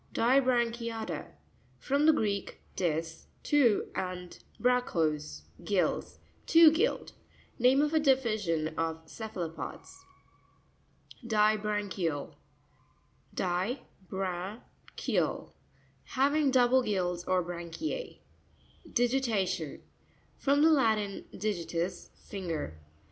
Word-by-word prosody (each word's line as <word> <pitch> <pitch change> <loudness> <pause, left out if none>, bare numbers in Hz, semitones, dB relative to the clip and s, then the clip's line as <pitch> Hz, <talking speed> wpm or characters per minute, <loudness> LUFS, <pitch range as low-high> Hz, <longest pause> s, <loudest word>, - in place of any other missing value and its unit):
Di'srancuta'tTa. 235 - +1 0.3
— 125 +2 -34
From 285 +3 +3
the - - +9
Greek, 205 -9 -1 0.2
dis, 165 -2 -2 0.2
two, 260 -8 +3
and 180 -1 -5 0.2
bragchos, 160 - 0 0.2
gills—two 310 - +3
gilled. 370 +10 0 0.5
Name 260 +4 +5
of 300 +1 0
a 315 - +4
division 215 - +1
of 160 0 -2
ce 220 +6 -7
phalopods. 170 - -6 1.3
Disra'ncurau 210 -7 0 1.0
(di 185 +8 -1 0.3
bra'nk 190 +3 -4 0.4
eal).— - - 0 0.5
Hav 275 +2 +1
ing 300 -3 +3
double 260 0 +4
gills 180 -6 -1
or 185 -1 +2
branchie. 175 - -5 0.7
Dieira'tion.—From 240 - -1
the 320 - +6
Latin, 220 -8 +1
digi 190 -5 -3
ius, 175 +2 -2
finger. 165 - -5
210 Hz, 90 wpm, -30 LUFS, 175-250 Hz, 1.3 s, the